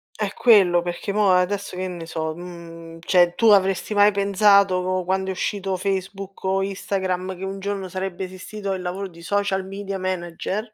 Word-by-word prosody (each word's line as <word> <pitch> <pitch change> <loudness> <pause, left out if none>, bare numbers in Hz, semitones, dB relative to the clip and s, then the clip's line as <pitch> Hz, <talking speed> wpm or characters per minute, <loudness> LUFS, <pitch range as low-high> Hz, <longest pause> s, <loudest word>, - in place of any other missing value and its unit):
È 205 -2 -3
quello, 190 -7 +5
perché 175 +3 -4
mo' 205 -2 +3
adesso, 185 +2 +1
che 185 0 -2
ne 175 -2 -7
so, 160 -1 -3
mhmm, 170 -1 -10
cioè 175 0 +3
tu 230 - +3
avresti 195 0 +3
mai 205 0 +5
pensato 200 -2 +3
quando 190 +1 -1
è - - 0
uscito 195 0 -2
Facebook 195 +1 -4
o 190 0 +1
Instagram, 190 -1 -3
che 185 - -8
un 195 +1 -5
giorno 195 -1 -3
sarebbe 185 0 -4
esistito 195 +2 -6
il 185 - -4
lavoro 185 +2 -4
di 170 -2 -15
social 195 +1 -1
media 195 0 -5
manager? 185 +4 -3
190 Hz, 175 wpm, -23 LUFS, 180-200 Hz, -, quello